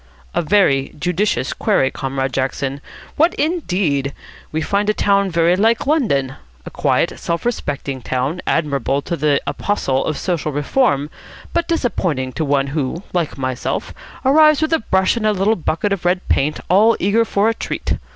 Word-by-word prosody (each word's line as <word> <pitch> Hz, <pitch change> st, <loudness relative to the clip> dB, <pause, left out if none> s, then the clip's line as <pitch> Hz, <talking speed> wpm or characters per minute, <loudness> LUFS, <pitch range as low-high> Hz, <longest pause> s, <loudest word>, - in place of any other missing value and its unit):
"A -, -, +1 dB
very 155 Hz, -7 st, +2 dB
judicious 180 Hz, -, 0 dB
query, 130 Hz, -, +1 dB
Comrade 135 Hz, -1 st, -3 dB
Jackson. 135 Hz, +1 st, -2 dB, 0.4 s
What, 330 Hz, +4 st, +3 dB
indeed? 180 Hz, -, -1 dB, 0.4 s
We 155 Hz, -, -1 dB
find 200 Hz, +5 st, 0 dB
a 215 Hz, -, +2 dB
town 200 Hz, -1 st, +2 dB
very 170 Hz, 0 st, +3 dB
like 225 Hz, +4 st, +2 dB
London. 175 Hz, -, +1 dB, 0.3 s
A -, -, -8 dB
quiet, -, -, 0 dB
self 170 Hz, +3 st, -3 dB
respecting 140 Hz, -, -3 dB
town, 130 Hz, +9 st, -2 dB
admirable 140 Hz, -3 st, 0 dB
to 170 Hz, -, -2 dB
the 145 Hz, -2 st, +2 dB
apostle 135 Hz, -10 st, -1 dB
of 155 Hz, -, -2 dB
social 170 Hz, -4 st, -2 dB
reform, 145 Hz, -, +1 dB, 0.4 s
but 340 Hz, 0 st, 0 dB
disappointing 175 Hz, -, -1 dB
to 160 Hz, -, -2 dB
one 140 Hz, -2 st, +1 dB
who, 155 Hz, +4 st, -2 dB
like 170 Hz, -5 st, -1 dB
myself, 130 Hz, -2 st, -3 dB, 0.3 s
arrives 305 Hz, +2 st, +6 dB
with 315 Hz, +1 st, 0 dB
a 325 Hz, -, +3 dB
brush 190 Hz, 0 st, +1 dB
and 220 Hz, -, -2 dB
a 215 Hz, -, +3 dB
little 200 Hz, +3 st, +2 dB
bucket 180 Hz, +3 st, -1 dB
of 195 Hz, -, -4 dB
red 180 Hz, +1 st, 0 dB
paint, 150 Hz, +3 st, +1 dB
all 215 Hz, +5 st, +4 dB
eager 205 Hz, +5 st, +3 dB
for 205 Hz, -1 st, +1 dB
a 225 Hz, -, +2 dB
treat. -, -, -3 dB
170 Hz, 165 wpm, -19 LUFS, 140-210 Hz, 0.4 s, arrives